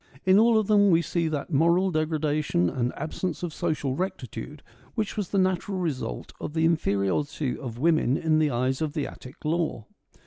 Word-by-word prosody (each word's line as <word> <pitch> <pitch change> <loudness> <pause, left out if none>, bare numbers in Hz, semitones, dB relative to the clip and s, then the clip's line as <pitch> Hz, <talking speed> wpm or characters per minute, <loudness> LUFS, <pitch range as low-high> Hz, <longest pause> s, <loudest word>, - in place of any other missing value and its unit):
In 190 +2 +6
all 230 0 +5
of 215 - +2
them 205 -1 +5
we 170 -1 +4
see 170 -1 -1
that 155 +1 -3
moral 170 +6 +3
degradation 155 - 0
and 125 -1 -1
absence 175 +2 -4
of 170 -3 -3
social 150 -6 -1
rectitude 145 - -5 0.3
which 215 -2 -2
was 205 -4 -3
the 200 - -1
natural 185 +1 +1
result 140 - -3
of 150 - -5
the 160 0 +2
in 165 +1 +4
feriority 125 +6 -1
of 120 -5 -7
women 155 -2 +2
in 155 -1 +2
the 155 -1 +3
eyes 130 +2 0
of 155 -2 -1
the 150 -3 -1
Attic 130 +4 -11
law. 160 -8 -1
155 Hz, 185 wpm, -26 LUFS, 135-180 Hz, 0.3 s, In